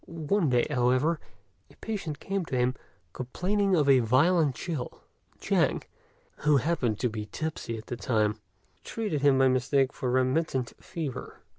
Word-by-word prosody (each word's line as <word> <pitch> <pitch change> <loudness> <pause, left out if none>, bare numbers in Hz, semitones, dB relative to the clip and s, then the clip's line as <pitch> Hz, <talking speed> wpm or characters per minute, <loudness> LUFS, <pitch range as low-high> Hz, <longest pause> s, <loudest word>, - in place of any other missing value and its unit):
One 165 +1 0
day, 125 -1 +3
however, 130 +4 +2 0.5
a - - -19
patient 180 -10 -5
came 195 -1 -2
to 130 - -2
him, 125 +1 +2 0.4
complaining 190 +9 0
of 150 -4 +2
a 135 -2 +6
violent 140 +5 +3
chill; 155 -9 -5 0.3
and - - -35
Chang, - - +1 0.5
who 150 -1 +3
happened 130 -6 0
to 125 - +2
be 110 -2 -5
tipsy 155 -7 -4
at 110 - -9
the 120 - -5
time, 110 -3 0 0.4
treated 205 -11 -3
him 140 -2 +5
by 135 0 +5
mistake 130 +1 +2
for 130 - -3
remittent 130 0 0
fever. 155 -7 -6
135 Hz, 155 wpm, -28 LUFS, 125-165 Hz, 0.5 s, a